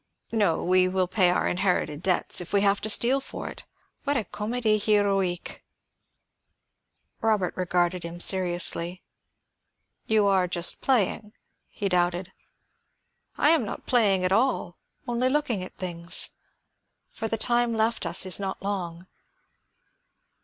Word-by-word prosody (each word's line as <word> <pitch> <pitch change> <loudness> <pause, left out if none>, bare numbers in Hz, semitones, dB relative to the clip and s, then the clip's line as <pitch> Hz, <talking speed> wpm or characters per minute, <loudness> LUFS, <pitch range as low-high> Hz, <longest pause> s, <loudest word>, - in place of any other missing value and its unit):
No; 205 -8 +1
we 185 +1 +3
will 185 0 0
pay 185 -1 +2
our 180 - 0
inherited 180 -5 -1
debts, 180 -1 +1
if 180 - -9
we 200 - +3
have 200 0 +2
to 215 - -3
steal 250 +5 +4
for - - -7
it. - - -11 0.4
What 285 -1 0
a 230 - -1
comédie 215 +2 -1
héroïque!" 200 -4 0 1.6
Robert 215 -5 0
regarded 180 0 -1
him 170 +1 -8
seriously. 175 -1 +2 1.0
"You 215 -2 +2
are 190 -2 +2
just 175 -1 +1
playing?" 220 -4 0 0.4
he 205 - -4
doubted. 180 0 0 1.1
"I 295 - +4
am 325 -6 +3
not 210 - -7
playing 200 -7 +2
at 185 - 0
all; 220 -5 0 0.3
only 240 +1 0
looking 260 -8 -1
at 185 - -10
things. 170 -2 0 0.8
For 225 - -5
the 225 - -2
time 240 0 +1
left 225 +1 0
us 170 +1 +2
is 185 -1 +3
not 195 -1 -5
long. 180 -3 -4
195 Hz, 135 wpm, -25 LUFS, 180-220 Hz, 1.6 s, steal